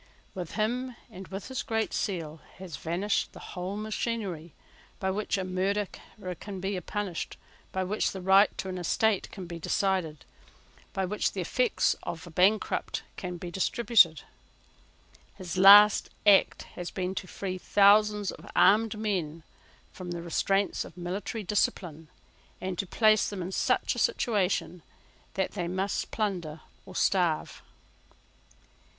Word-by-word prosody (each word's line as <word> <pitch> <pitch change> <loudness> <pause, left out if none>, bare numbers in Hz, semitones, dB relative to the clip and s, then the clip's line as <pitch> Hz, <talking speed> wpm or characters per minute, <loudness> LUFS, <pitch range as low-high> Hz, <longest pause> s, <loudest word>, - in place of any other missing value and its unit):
With 180 -4 -6
him, 245 +4 -1 0.2
and 190 -2 -9
with 195 +5 -7
his 260 - -3
Great 225 -1 -2
Seal, 165 -6 -3 0.2
has 185 -4 -8
vanished 185 +5 -1
the - - -11
whole 185 +3 -4
machinery 210 - -4 0.4
by 190 -2 0
which 205 +1 -1
a 190 - -2
murderer 185 +1 -3
can 200 -2 -7
be 190 0 -2
punished, 200 -1 -4 0.3
by 190 - -1
which 205 +4 0
the 190 - -6
right 190 +2 +5
to - - -4
an 185 -1 -4
estate 205 +4 +1
can 190 -3 -8
be 170 -1 -7
decided, 175 -4 -1 0.7
by 190 - -1
which 210 +3 -1
the 190 - -3
effects 245 +7 +1
of 165 0 -6
a 175 - -11
bankrupt 190 +6 +1
can 180 -1 -5
be 175 0 -7
distributed. 190 - +3 1.1
His 180 -2 -6
last 200 +2 +8 0.2
act 205 -2 +5
has 175 -1 -5
been 185 0 -3
to 185 - -5
free 185 0 -5
thousands 205 +1 +4
of - - -12
armed 215 +3 +4
men 175 -7 -2 0.5
from 185 -2 -8
the 170 -1 -5
restraints 195 +4 0
of - - -13
military 190 +5 -4
discipline, 175 -5 -1 0.5
and 185 0 -3
to 195 - -1
place 215 +2 +3
them 195 -3 -5
in 180 - -5
such - - +1
a - - -5
situation 205 - 0 0.5
that 190 -1 0
they 175 -4 -3
must 190 +3 -2
plunder 175 -8 -3 0.3
or 185 - -11
starve. 175 -5 +1
190 Hz, 145 wpm, -28 LUFS, 180-210 Hz, 1.1 s, last